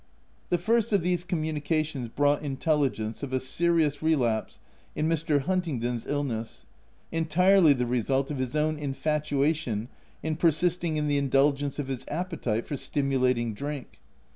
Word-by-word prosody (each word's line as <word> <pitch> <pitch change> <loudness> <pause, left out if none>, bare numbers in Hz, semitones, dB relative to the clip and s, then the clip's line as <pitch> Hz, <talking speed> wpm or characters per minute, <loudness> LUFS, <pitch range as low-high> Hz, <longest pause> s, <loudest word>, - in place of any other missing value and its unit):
The 175 - +3
first 225 +5 +1
of 195 -4 +3
these 175 -1 +1
communications 155 -5 -1
brought 145 +4 +2
intelligence 135 -6 -1
of 140 -2 -5
a 130 - +2
serious 155 +1 +1
relapse 125 -9 +1 0.4
in 155 - 0
Mr. 155 -3 +1
Hun 185 +6 +1
tingdon's 120 -8 -3
illness, 130 -6 -3 0.5
entirely 165 +1 +4
the 125 -2 -1
result 130 +3 0
of 140 - -4
his 130 +2 -2
own 155 0 +1
infatuation 145 -4 -1 0.3
in 155 -1 -1
persisting 170 0 +1
in 150 0 0
the 145 -1 +2
indulgence 140 +1 +2
of 145 -3 -3
his 135 -2 -4
appetite 155 - -2
for 145 - -4
stimulating 130 -5 0
drink. 140 - -6
145 Hz, 140 wpm, -27 LUFS, 130-160 Hz, 0.5 s, entirely